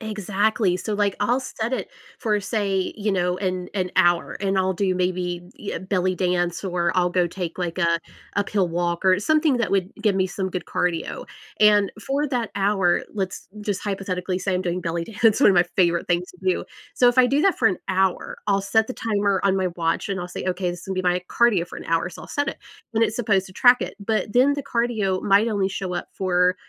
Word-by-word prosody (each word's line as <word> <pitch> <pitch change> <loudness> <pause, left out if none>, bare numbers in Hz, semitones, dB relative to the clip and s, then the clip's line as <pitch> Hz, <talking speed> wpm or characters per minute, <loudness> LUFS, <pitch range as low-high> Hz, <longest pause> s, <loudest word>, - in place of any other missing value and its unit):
Exactly, 210 -2 0
so, 210 +3 -3
like, 205 -1 0
I'll 240 +6 +1
set 235 -1 -4
it - - -2 0.3
for, 215 -4 +1
say, 200 -2 -1
you 210 0 -1
know, 180 -1 0
an 185 -2 -2
an 180 -2 -1
hour, 175 -1 +3
and 195 -1 0
I'll 190 0 +2
do 185 0 0
maybe 180 -1 -1 0.2
e 205 - -5
a - - -4
belly 185 -1 0
dance 175 -1 0
or 175 -2 0
I'll 180 -1 +3
go 180 -1 +2
take, 175 0 -5
like, 175 0 -3
a 170 -2 +2 0.4
uphill 200 -2 +1
walk 175 +1 -2
or 185 0 +5
something 305 +3 +2
that 235 -4 -1
would 190 -1 0
give 210 -3 +2
me 190 -1 +1
some 190 0 -3
good 180 -1 -4
cardio, 175 -2 -2 0.3
and 210 -2 +5 0.2
for 285 +2 0
that 245 -4 -2
hour, 195 -3 +2
let's 190 -3 -4
just 205 -2 -3
hypothetically 185 -2 -2
say 190 -1 -1
I'm 180 - 0
doing 180 0 -2
belly 170 0 -2
dance, 225 +3 +2
one 210 - +7
of 190 - +3
my 175 - +6
favorite 170 -2 +2
things 175 0 0
to 180 - -20
do. 185 - 0 0.3
So, 245 - +5
if 245 +1 +1
I 250 - +7
do 280 +3 +2
that 390 - +3
for - - +3
an 185 - +1
hour, 190 -1 0
I'll 200 -1 +2
set 220 +2 +2
the 255 - -6
timer 200 -3 0
on 195 -1 +2
my 190 -1 +1
watch, 165 +2 -1
and 190 -2 -2
I'll 175 - -5
say, - - -6
"Okay, 180 -1 -1
this 175 0 -8
will 190 - -3
be 185 - -1
my 180 0 +1
cardio 210 -8 +3
for - - -10
an - - -8
hour," 165 +1 +1
so, 175 - -11
I'll - - -11
set 285 -1 -1
it, - - -4 0.4
and 225 - +3
it's 220 -1 +1
supposed 200 -5 +1
to 185 - -13
track 245 +5 +5
it, - - -5
but 210 0 -1
then 260 +4 +4
the 285 - -4
cardio 235 -7 0
might 205 +3 +4
only 200 -3 0
show 190 -1 -4
up - - -3
for 180 -1 +2
190 Hz, 230 wpm, -23 LUFS, 180-210 Hz, 0.4 s, one